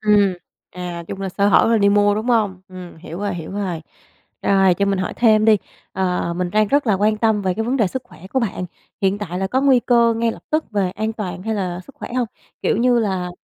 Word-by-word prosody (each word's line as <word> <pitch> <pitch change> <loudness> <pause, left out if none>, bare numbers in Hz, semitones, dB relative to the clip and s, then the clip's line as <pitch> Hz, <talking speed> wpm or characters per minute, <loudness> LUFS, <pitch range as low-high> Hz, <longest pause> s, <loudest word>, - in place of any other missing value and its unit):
Ừm, 205 -3 +3 0.4
à, 175 -1 -6
chung 195 - -6
là 195 - -2
sơ 200 +2 +1
hở - - +5
là 230 - +4
đi 200 -1 +4
mua, 205 0 +4
đúng 215 +3 -3
hông? 210 -6 +1
Ừm, 185 -2 -10
hiểu 165 +1 -9
rồi, 205 -2 -2
hiểu 165 -2 -7
rồi. 190 -5 -3 0.6
Rồi, 195 -2 +4
cho 200 - 0
mình 200 -1 +1
hỏi 185 - -2
thêm 215 -3 +4
đi, 220 -1 +6 0.4
ờ, 180 -2 -1
mình 180 0 -2
đang 215 +1 +2
rất 285 -1 +2
là 215 - +3
quan 210 +3 +2
tâm 220 -2 +2
về 185 -1 0
cái 220 - -2
vấn 250 +4 0
đề 225 -6 +3
sức 255 +8 -4
khỏe 185 - -14
của 265 - +2
bạn, 205 -5 -2 0.4
hiện 195 0 +1
tại 180 -3 -4
là 190 - 0
có 255 +7 0
nguy 270 -3 +4
cơ 235 -1 +3
ngay 230 0 +1
lập - - -12
tức 310 +1 -1
về 200 -4 0
an 215 +4 -3
toàn 185 -5 -5
hay 220 +2 -2
là 180 -3 -3
sức 280 - -15
khỏe - - -8
hông? 250 -2 +1 0.4
Kiểu - - +1
như 245 +2 +3
là, 190 -5 -1
205 Hz, 255 wpm, -20 LUFS, 185-225 Hz, 0.6 s, đi